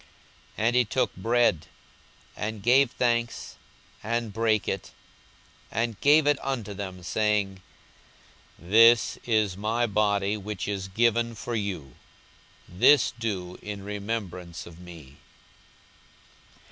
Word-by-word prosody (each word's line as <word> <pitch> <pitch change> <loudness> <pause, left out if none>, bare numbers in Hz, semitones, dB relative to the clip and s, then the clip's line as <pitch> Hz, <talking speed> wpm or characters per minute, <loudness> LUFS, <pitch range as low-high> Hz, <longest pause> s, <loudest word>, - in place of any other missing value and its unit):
42:022:019 110 - -1
And 120 - +1
he 125 -1 +4
took 130 +4 -1
bread, 115 -6 +1 0.7
and 105 -1 -5
gave 130 +3 +5
thanks, 120 -1 -1 0.5
and 115 -1 -2
brake 110 -2 +1
it, - - -3 0.8
and 115 -1 -2
gave 150 +1 +5 0.2
unto 120 -7 -3
them, 95 -2 -7
saying, 100 -1 0 1.0
This 115 +6 +5
is 110 -5 +1
my 110 +4 0
body 105 -1 +1
which 105 -2 -5
is 100 -2 -3
given 115 +3 +1
for 120 +2 -6
you: 95 - -4 0.7
this 120 +10 +4
do 95 -6 -4
in 100 -1 -7
remembrance 100 -5 -5
of 85 0 -13
me. 80 -6 -13
105 Hz, 110 wpm, -26 LUFS, 95-115 Hz, 1.0 s, gave